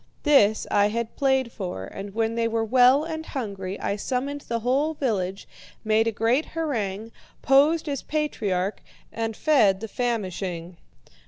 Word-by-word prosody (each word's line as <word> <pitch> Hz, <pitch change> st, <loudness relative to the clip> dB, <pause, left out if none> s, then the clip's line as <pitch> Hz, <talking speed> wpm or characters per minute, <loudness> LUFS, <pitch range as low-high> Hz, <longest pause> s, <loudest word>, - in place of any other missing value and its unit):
This 220 Hz, -8 st, +4 dB
I 205 Hz, 0 st, +4 dB
had 230 Hz, +1 st, -3 dB
played 265 Hz, -3 st, +1 dB
for, 180 Hz, -, -5 dB
and 195 Hz, -, -8 dB
when 225 Hz, 0 st, 0 dB
they 230 Hz, 0 st, 0 dB
were 225 Hz, 0 st, -1 dB
well 255 Hz, +5 st, +5 dB
and 320 Hz, 0 st, -4 dB
hungry, 200 Hz, -10 st, -5 dB
I 200 Hz, -, -2 dB
summoned 275 Hz, +6 st, -3 dB
the 235 Hz, -3 st, -3 dB
whole 280 Hz, +7 st, +1 dB
village, 195 Hz, -9 st, -2 dB, 0.4 s
made 220 Hz, +1 st, +2 dB
a -, -, +2 dB
great 230 Hz, +7 st, +1 dB
harangue, 225 Hz, -9 st, -2 dB, 0.3 s
posed 300 Hz, +5 st, +4 dB
as 280 Hz, -2 st, -2 dB
patriarch, 210 Hz, -11 st, -2 dB, 0.3 s
and 225 Hz, -1 st, -3 dB
fed 220 Hz, -11 st, +3 dB
the 225 Hz, -, -5 dB
famishing. 185 Hz, -7 st, -3 dB
230 Hz, 150 wpm, -25 LUFS, 200-270 Hz, 0.4 s, well